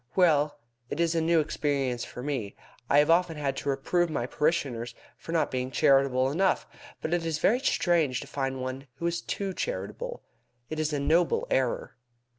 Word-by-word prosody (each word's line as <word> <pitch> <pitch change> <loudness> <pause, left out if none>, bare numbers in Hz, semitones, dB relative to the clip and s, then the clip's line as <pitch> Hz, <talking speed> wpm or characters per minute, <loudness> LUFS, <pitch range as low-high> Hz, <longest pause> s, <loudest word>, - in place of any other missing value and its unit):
Well, 155 -5 +3 0.3
it - - -4
is 170 -1 +2
a 165 - +1
new 165 +1 +3
experience 140 -5 -1
to 125 - -7
me. 130 -8 -3 0.3
I 140 - +5
have 150 +2 +5
often 170 -1 +3
had 140 -2 -1
to 145 - -3
reprove 170 +6 +1
my 130 -6 -1
parishioners 125 -5 -1 0.2
for - - -9
not 165 -1 +1
being 130 0 -2
charitable 135 0 +3
enough, 190 +5 +1 0.4
but 160 - -1
it 175 -1 +1
is 165 -2 -1
very 220 +10 +3
strange 170 - +2
to - - -7
find 135 -1 -3
one 130 +2 -5
who 170 - -5
is 170 0 0
too 195 +1 -3
charitable. - - -4 0.5
It 155 - -3
is 155 0 0
a 145 - -1
noble 165 +5 +2
error." 130 -2 0
150 Hz, 185 wpm, -28 LUFS, 135-170 Hz, 0.5 s, I